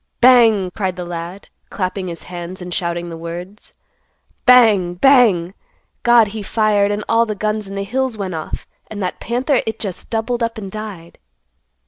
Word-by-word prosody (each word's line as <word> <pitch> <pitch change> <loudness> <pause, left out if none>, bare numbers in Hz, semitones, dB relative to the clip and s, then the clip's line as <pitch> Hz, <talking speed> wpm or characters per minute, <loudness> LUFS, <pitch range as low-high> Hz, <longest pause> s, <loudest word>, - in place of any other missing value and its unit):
"Bang!" 225 -7 +5
cried 190 -2 -2
the 180 -1 -6
lad, 175 +3 -7 0.2
clapping 185 0 -3
his 170 -1 -7
hands 175 +1 -7
and 180 -1 -7
shouting 170 -1 -2
the 165 - -7
words; 175 +5 -8 0.7
"Bang! 215 -8 +5
Bang! 200 -7 +4 0.5
God, 240 -3 +5
he 215 +1 -6
fired 205 -1 +2
and 205 +1 -2
all 230 0 +3
the 215 - -3
guns 215 0 -2
in 195 - -7
the 200 - -2
hills 255 +2 -2
went 190 -3 -4
off, 160 -1 -5 0.2
and 215 - -7
that 180 - -3
panther 250 +3 0
it 220 0 -2
just 190 -4 -6
doubled 235 +2 -2
up 230 -1 -1
and 195 -3 -7
died. 205 -6 -8
200 Hz, 170 wpm, -18 LUFS, 180-225 Hz, 0.7 s, Bang